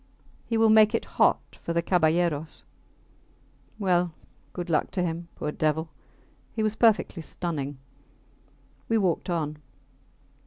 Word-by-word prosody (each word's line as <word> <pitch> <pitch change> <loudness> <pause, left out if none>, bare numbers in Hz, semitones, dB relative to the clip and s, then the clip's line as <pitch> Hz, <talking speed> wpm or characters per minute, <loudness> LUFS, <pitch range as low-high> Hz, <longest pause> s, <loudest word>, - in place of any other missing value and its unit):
He 230 - 0
will 225 -1 +5
make 215 +1 +6
it - - -1 0.2
hot - - +2
for 170 - -3
the 170 0 +1
caballeros. 165 -3 +1 1.1
Well, 180 -4 +1 0.4
good 175 -1 -5
luck 165 -3 +1
to 180 - 0
him, 170 0 -3
poor 150 - -3
devil! 155 +1 0 0.7
He 220 - 0
was 215 0 0
perfectly 220 -6 +3
stunning. 145 -4 -4 1.1
We 225 - +3
walked 185 -3 0
on. 155 -3 -2
175 Hz, 125 wpm, -27 LUFS, 160-210 Hz, 1.1 s, make